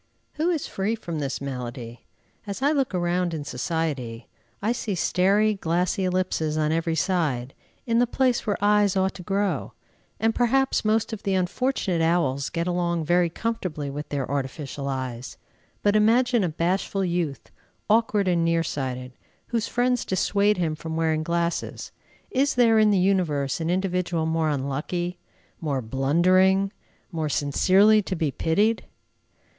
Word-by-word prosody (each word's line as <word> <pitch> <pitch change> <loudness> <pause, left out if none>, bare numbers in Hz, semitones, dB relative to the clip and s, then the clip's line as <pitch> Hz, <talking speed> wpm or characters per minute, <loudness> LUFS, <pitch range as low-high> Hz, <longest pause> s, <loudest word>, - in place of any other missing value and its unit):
Who 315 +3 0
is 330 -5 -1
free 200 +4 -2
from 170 -8 -5
this 140 -2 -3
malady? 120 -4 -6 0.4
As 200 +6 -4
I 285 - +4
look 270 -9 0
around 175 -1 0
in 150 - -4
society, 135 -5 -3 0.3
I 215 +3 0
see 220 -4 -2
staring 200 +4 +2
glassy 180 +3 0
ellipses 180 -4 0
on 155 0 +1
every 165 0 0
side 150 -7 0 0.3
"in 230 -1 +2
the 245 - +3
place 250 -1 +1
where 205 - +1
eyes 205 -1 +3
ought 190 0 +1
to 185 - -9
grow," 195 +1 -1 0.5
and 225 0 +2
perhaps 265 +3 +2
most 220 +1 +1
of 220 - -5
the 195 -1 0
unfortunate 185 -1 0
owls 160 -5 +1
get 170 0 -2
along 175 -2 -1
very 175 +1 +3
comfortably 170 -8 -3
with 145 +2 -6
their 140 -3 -2
artificial 140 0 -4
eyes. 130 -2 -5 0.5
But 205 0 +3
imagine 235 +2 +3
a 180 - +1
bashful 185 +4 -1
youth, 170 -5 -3 0.4
awkward 215 -2 +2
and 175 -2 +2
near 165 0 +2
sighted, 130 -4 -4 0.4
whose 230 -3 -1
friends 245 0 +1
dissuade 200 +2 +1
him 165 -3 0
from 160 +1 -6
wearing 160 -1 +1
glasses. 170 +1 -2 0.4
Is 275 +2 +1
there 230 -3 +5
in 215 -1 +5
the 205 - +3
universe 170 -7 +1
an 165 - -1
individual 180 -3 0
more 160 -1 +1
unlucky, 150 +6 -2 0.4
more 145 -5 -1
blundering, 180 - +2 0.4
more 160 -3 -2
sincerely 190 +10 +4
to 190 -1 -4
be 160 -4 -1
pitied? 205 +11 +1
175 Hz, 150 wpm, -25 LUFS, 155-205 Hz, 0.5 s, there